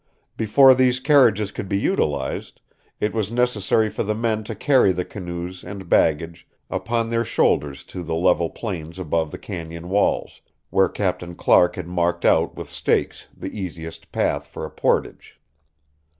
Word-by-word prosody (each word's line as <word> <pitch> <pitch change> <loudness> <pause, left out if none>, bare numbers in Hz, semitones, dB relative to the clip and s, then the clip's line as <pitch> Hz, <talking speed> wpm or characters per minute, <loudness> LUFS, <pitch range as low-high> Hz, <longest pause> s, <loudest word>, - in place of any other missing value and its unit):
Before 130 +5 +6
these 130 0 +3
carriages 130 -7 +4
could 95 - -6
be 100 - +1
utilized, 75 - -1 0.4
it 105 - -1
was 110 -2 -1
necessary 115 -3 +2
for - - -4
the 105 +1 -1
men 110 -1 -1
to 110 - -5
carry 130 -3 +4
the 90 0 -2
canoes 90 -1 -7
and 95 0 -8
baggage 85 +1 +1 0.2
upon 115 +5 -1
their 115 0 +1
shoulders 70 -9 0
to 90 - -8
the 80 -1 -3
level 85 -1 +2
plains 85 -6 -6
above 80 -3 -1
the - - -7
cañon 85 -2 -7
walls, 100 +2 0 0.3
where 95 -2 +3
Captain 90 -3 -3
Clark 90 +1 +4
had - - -5
marked 85 -1 -1
out - - +3
with - - -7
stakes - - -1
the 95 - -7
easiest 85 -5 -7
path 75 0 -1
for 75 - -7
a - - -8
portage. - - -1
95 Hz, 160 wpm, -22 LUFS, 85-110 Hz, 0.4 s, Before